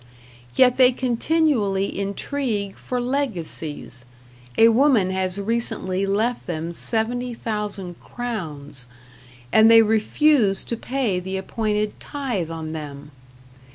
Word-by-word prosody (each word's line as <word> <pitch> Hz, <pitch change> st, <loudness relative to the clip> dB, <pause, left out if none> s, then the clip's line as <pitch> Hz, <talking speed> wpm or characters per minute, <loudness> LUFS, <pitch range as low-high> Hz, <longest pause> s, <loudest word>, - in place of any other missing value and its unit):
Yet 250 Hz, -1 st, +5 dB
they 255 Hz, -1 st, +7 dB
continually 240 Hz, -7 st, +1 dB
intrigue 200 Hz, 0 st, -2 dB
for 250 Hz, -, -4 dB
legacies 175 Hz, -, -3 dB, 0.5 s
a 225 Hz, -, +7 dB
woman 230 Hz, -6 st, +4 dB
has 190 Hz, 0 st, -2 dB
recently 200 Hz, -3 st, -1 dB
left 220 Hz, +5 st, 0 dB
them 165 Hz, 0 st, -3 dB
70,000 220 Hz, -4 st, -3 dB
crowns 155 Hz, -, -6 dB, 0.7 s
and 220 Hz, +1 st, +7 dB
they 225 Hz, 0 st, +8 dB
refuse 220 Hz, 0 st, +3 dB
to 235 Hz, -, -3 dB
pay 235 Hz, -6 st, -1 dB
the 190 Hz, +1 st, -4 dB
appointed 210 Hz, +1 st, -2 dB
tithe 245 Hz, -, -3 dB
on 160 Hz, -1 st, -5 dB
them. 145 Hz, -2 st, -7 dB
210 Hz, 105 wpm, -23 LUFS, 185-245 Hz, 0.7 s, they